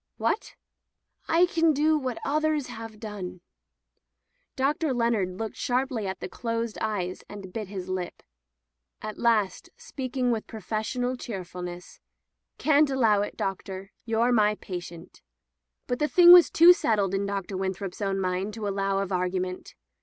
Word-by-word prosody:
"What?" - - -1 0.7
"I 335 +2 +5
can 330 -2 +2
do 305 +2 +3
what 260 -5 -2
others 305 -1 +1
have 225 -3 -9
done." 200 -5 -7 1.1
Dr. 280 +1 0
Leonard 220 -6 0
looked 220 +1 -5
sharply 250 -4 -1
at 190 - -5
the - - -3
closed 230 -2 -3
eyes 190 -4 -2
and 195 -3 -9
bit 215 -3 -4
his 190 -2 -6
lip. 185 -2 -4 0.8
At 215 -1 -6
last, 225 - +1
speaking 260 - -2
with 225 -2 -2
professional 225 +4 -3
cheerfulness, 180 -5 -7 0.6
'Xan't 300 -1 +4
allow 225 -6 +3
it, 205 - -4
Doctor. 195 0 -4
You're 230 +1 +1
my 210 -3 +3
patient." 175 -3 -8 0.6
But 245 -1 -2
the 300 - +2
thing 350 +2 +8
was 355 -1 +10
too 340 +2 +8
settled 205 - 0
in 195 +1 0
Dr. 200 -1 -3
Win^ 190 0 -1
throp's 190 +1 -7
own 195 -1 0
mind 190 +3 -2
to 215 -2 -4
allow 195 0 0
of 195 - -7
argument. 185 0 -2
215 Hz, 145 wpm, -27 LUFS, 190-255 Hz, 1.1 s, was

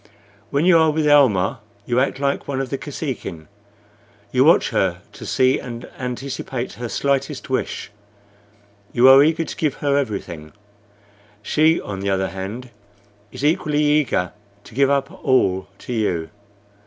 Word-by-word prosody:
When 145 +4 +1
you 175 -2 +6
are 160 0 +4
with 155 0 0
Almah 120 -10 +4 0.3
you 120 0 +1
act 135 0 0
like 140 0 -1
one 135 -2 -2
of 135 -2 -4
the 135 - -1
Kosekin. 130 - -6 0.8
You - - +4
watch - - +5
her - - 0
to - - -10
see 130 0 +2
and 120 -2 -8
anticipate 125 0 -5
her 120 0 -6
slightest 140 +1 -1
wish; 130 - -2 1.0
you 120 +2 +5
are 135 +1 +9
eager 160 +2 +2
to - - -7
give 150 -4 -1
her 140 -1 0
everything. 95 - -4 0.9
She, 160 +2 +3
on 95 -2 -6
the 100 +1 -2
other 95 0 0
hand, 105 +7 -7 0.6
is 145 - -4
equally 150 -1 +1
eager 145 -11 +1 0.3
to - - -15
give 135 +3 +3
up 140 +1 0
all 95 -9 +2
to 125 - -7
you. 90 -8 -1
130 Hz, 155 wpm, -21 LUFS, 110-145 Hz, 1.0 s, are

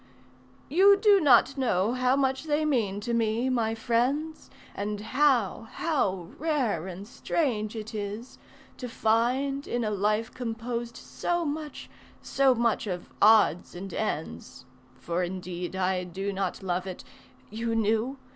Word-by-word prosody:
"You 390 +6 +6
do 405 -1 +5
not 270 -1 +5
know 225 -3 +1
how 255 +1 +2
much 265 +1 0
they 305 0 +1
mean 215 -9 0
to 235 +3 -3
me, 230 +2 +1
my 225 -3 0
friends, 255 +8 -1 0.2
And 205 0 -3
how, 235 -2 +1
how 190 - -1
rare 255 - 0
and 190 +2 -8
strange 235 -5 -2
it 220 +1 -6
is, 210 +3 -6 0.4
to 250 - -6
find 250 +6 0
In 240 0 -1
a 215 - -1
life 210 +3 0
composed 235 0 -4
so 345 -1 -2
much, 300 0 -5 0.3
so 270 -2 +2
much 230 -1 0
of 180 -2 -5
odds 210 -6 +4
and 190 +1 -7
ends, 160 -9 -4 0.3
(For 170 +6 -2
indeed 180 0 -4
I 185 -1 0
do 195 +3 -4
not 190 0 -3
love 180 0 -2
it... 185 - -7 0.5
you 230 +1 -2
knew? 225 +4 0
225 Hz, 140 wpm, -27 LUFS, 200-265 Hz, 0.5 s, You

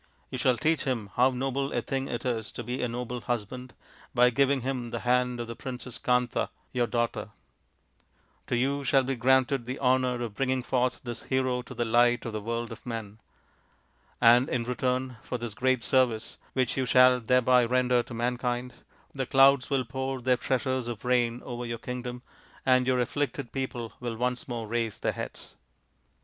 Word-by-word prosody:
You 130 - -4
shall 125 -2 +3
teach 155 +4 +1
him 115 -7 -2
how 125 +2 +5
noble 135 +2 -2
a - - 0
thing 135 -1 -2
it 120 +1 -4
is 115 -4 -2
to 120 - -5
be 125 +3 -3
a 125 - +1
noble 125 +1 -4
husband, 125 +2 -4 0.4
by 125 0 +5
giving 140 +1 +2
him 125 -1 -3
the - - -4
hand 125 0 +1
of 120 - -2
the 115 0 -7
Princess 125 -1 -7
Kanta, 125 0 +1 0.2
your 120 -2 +1
daughter. 120 -1 -1 1.2
To - - 0
you 140 +3 0
shall 135 0 +3
be 135 +1 -1
granted 130 0 +2
the 130 +2 -3
honour 125 -2 +2
of 115 -3 -5
bringing 130 +2 0
forth 125 0 0
this 120 -2 -6
hero 130 -1 0
to 120 - -11
the 120 - 0
light 120 +1 +3
of 115 - -4
the 110 - -3
world 115 +2 -3
of 115 - -9
men. 110 -3 -6 1.0
And 120 +2 +6
in 120 -2 0
return 125 +1 -1
for 125 - -4
this 120 -3 -5
great 130 +1 +1
service 120 -3 +1 0.2
which 130 -1 0
you 130 -1 0
shall 125 +1 +6
thereby 125 +1 +4
render 125 0 +2
to 120 - -10
mankind, 125 +1 -1 0.4
the 135 -2 -3
clouds 135 -1 +5
will 135 -2 +1
pour 130 +2 -3
their 125 +1 +2
treasures 130 -1 -1
of 115 -2 -6
rain 120 -1 +1
over 120 -1 -5
your 115 -1 -3
kingdom, 125 +1 -6 0.4
and 130 -1 +4
your 130 -1 +2
afflicted 140 0 -2
people 130 -4 -4
will 120 -2 -4
once 125 +1 -2
more 120 -3 -4
raise 115 0 -2
their - - 0
heads." - - -7
125 Hz, 185 wpm, -28 LUFS, 120-130 Hz, 1.2 s, And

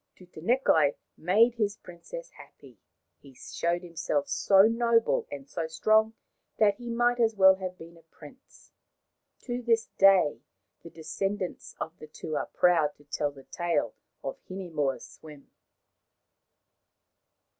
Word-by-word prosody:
Tutanekai 175 - +1 0.2
made 215 +8 +3
his 210 -3 -1
princess - - -10
happy. - - -17 0.4
He 135 -2 -17
snowed 170 +7 -3
himself 160 -4 -2
so 195 -1 +4
noble 230 +1 +2
and 140 -1 -8
so 165 +1 -4
strong 215 +7 +2 0.4
that 210 -2 +4
he 240 -1 -8
might 240 +1 +1
just 225 -2 +2
as - - -26
well 190 0 +8
have 185 -1 -6
been 165 +1 -13
a - - -18
prince. 155 -2 -17 0.7
To 245 -1 -4
this 230 -1 +1
day 190 -10 +5 0.4
the 170 - -11
descendants 185 +4 -4
of 160 +1 -6
the 155 - -10
two 155 0 -7
are - - -2
proud 165 -5 +2
to 145 - -22
tell 145 0 -2
the 140 -1 -14
tale 165 -10 -2 0.3
of 135 - -5
Hinemoa's 165 -8 -3
swim. 150 -3 -15
180 Hz, 135 wpm, -28 LUFS, 155-220 Hz, 0.7 s, well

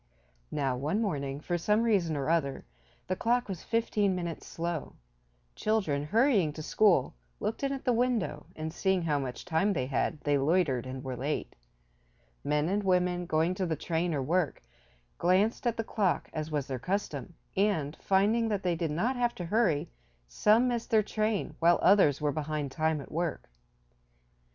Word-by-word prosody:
Now 135 -4 -1
one 150 +11 -1
morning, 140 -10 -2
for 175 +3 -2
some 210 +6 +2
reason 185 -9 +2
or 140 - -2
other, 155 -5 0 0.4
the 185 - -1
clock 240 +5 +1
was 190 -4 -5
fifteen 210 -4 +1
minutes 170 -2 -5
slow. 170 -2 -4 0.6
Children, 175 -10 0
hurrying 210 - +3
to 155 - -7
school, 185 -7 +3 0.3
looked 220 - -3
in 275 -1 0
at 270 -1 -5
the 250 - +3
window, 230 -11 0
and, 160 0 -5
seeing 190 -2 +1
how 150 -3 +1
much 130 -2 -5
time 180 +5 +1
they 130 -7 -1
had 145 +4 -1
they 145 -1 +2
loitered 140 -4 +1
and 130 +1 -6
were 130 -2 -4
late. 140 +5 -3 0.9
Men 150 +1 +1
and 200 +3 +1
women, 180 -2 +1
going 160 +3 +2
to 185 0 -2
the 160 - 0
train 170 +2 -1
or 135 - -1
work, 160 - 0 0.6
glanced 195 +7 +2
at 235 - 0
the 225 - -1
clock, 205 -5 -1
as 155 0 -3
was 150 -3 -1
their 130 -2 -4
custom, 170 -4 -3 0.2
and, 165 -7 +1
finding 210 +4 +2
that 205 -2 -1
they 175 -2 +1
did 165 -1 -2
not 215 - 0
have 240 -1 0
to 175 - -5
hurry 180 -5 +1 0.4
some 215 - +3
missed 240 -1 -2
their 220 -3 +4
train, 215 -4 -1
while 170 +1 +5
others 185 -8 +5
were 150 -1 +1
behind 150 -2 -3
time 155 0 0
at - - -12
work. 160 - -2
175 Hz, 175 wpm, -30 LUFS, 150-210 Hz, 0.9 s, while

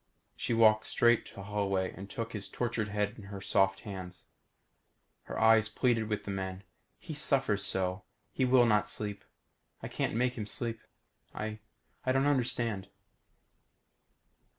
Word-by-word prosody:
She 115 - -1
walked 110 -1 +5
straight 120 -1 +3
to 100 - -10
Holloway 100 -2 -1
and 100 +1 -9
took 115 +1 -5
his 105 -2 -5
tortured 120 -3 -1
head 105 0 0
into 100 -3 -10
her 100 0 -7
soft 95 0 +2
hands. 95 -3 -8 1.0
Her - - -6
eyes 110 -1 +5
pleaded 115 -1 +1
with 105 -1 -1
the 100 - -4
men. 95 0 -4 0.3
"He - - -8
suffers - - +2
so. 95 +1 0 0.3
He 130 - 0
will 125 -1 +6
not 105 -2 +3
sleep. 105 -1 -4 0.6
I - - -3
can't - - -2
make 125 +1 +2
him 105 - -4
sleep. 115 +1 -3 0.6
I 110 0 -4 0.4
I 130 - +1
don't 135 +1 +3
understand." 120 -7 0
105 Hz, 150 wpm, -31 LUFS, 100-115 Hz, 1.0 s, will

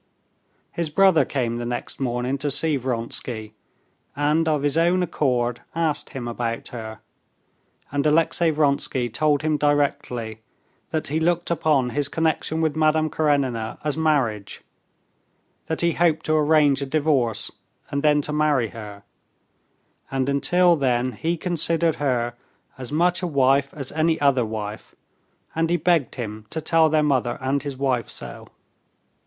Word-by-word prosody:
His 170 -2 -3
brother 165 -3 +4
came 120 -4 -2
the 120 - -4
next 120 0 -4
morning 125 +1 -1
to 145 - -1
see 145 +2 +2
Vronsky, 115 -3 -4 0.6
and 150 +3 +1
of 150 -3 +1
his 145 0 +1
own 175 +2 +3
accord 125 -7 0
asked 160 -3 -1
him 125 -4 -5
about 115 -1 -3
her, 110 -2 -8 0.9
and 145 0 0
Alexey 165 +2 +3
Vronsky 140 -5 0
told 145 +5 +1
him 155 -1 +1
directly 140 -6 0 0.5
that 155 -3 -2
he 155 +3 0
looked 170 +1 0
upon 145 -7 +1
his 145 +2 0
connection 160 0 0
with 155 -2 0
Madame 155 0 +2
Karenina 135 -7 0
as 150 -2 -1
marriage; 135 -11 0 1.0
that 160 - -2
he 170 0 +3
hoped 160 -2 +1
to 155 - +1
arrange 150 -2 +3
a 140 - -3
divorce, 140 -6 +1 0.4
and 140 - -1
then 150 -1 +3
to 150 - -2
marry 150 -6 +2
her, 105 -2 -10 1.1
and 135 -1 -1
until 170 +6 +3
then 130 -3 0
he 165 +9 -2
considered 165 -1 +1
her 120 -4 0 0.4
as 130 -3 -8
much 175 +3 +2
a 180 - -1
wife 140 -2 +2
as 140 -4 -5
any 160 +1 +1
other 135 -4 +3
wife, 110 -1 -6 0.6
and 165 0 0
he 175 - +2
begged 165 -5 +1
him 110 -3 -6
to 160 - -4
tell 160 0 +3
their 155 0 +2
mother 130 -5 +1
and 135 +1 -1
his 140 -3 -6
wife 130 -3 0
so. - - -7
145 Hz, 150 wpm, -23 LUFS, 125-160 Hz, 1.1 s, brother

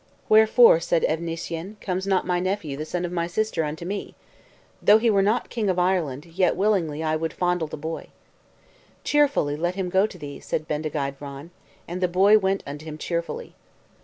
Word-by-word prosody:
"Wherefore," 220 -3 +7
said 170 0 0
Evnissyen, 165 +3 -3
"comes 190 0 -3
not 190 -2 +2
my 180 -1 0
nephew, 185 -6 -2
the 155 +2 -5
son 175 +2 -3
of 175 - -5
my 170 -1 -1
sister, 180 -2 -1
unto 155 +3 -5
me? 200 +3 -5 0.7
Though 210 - +7
he 225 0 +2
were 200 -2 +3
not 210 +4 0
king 220 -4 -1
of 185 - 0
Ireland, 175 -7 0
yet 180 +2 +1
willingly 175 -7 0
would 155 +1 -1
I - - -23
fondle 180 -2 0
the - - -7
boy." 160 +2 -5 1.0
"Cheerfully 285 - +2
let 175 +4 -2
him 190 -2 -2
go 190 +3 +3
to 190 - -12
thee," 145 -3 -8
said 155 - -3
Bendigeid 150 -2 -3
Vran; 140 +3 -9 0.4
and 180 +2 -5
the 180 - +3
boy 195 +4 +5
went 195 0 0
unto 145 +2 -7
him 155 -1 -7
cheerfully. 170 - -4
175 Hz, 190 wpm, -24 LUFS, 155-195 Hz, 1.0 s, Wherefore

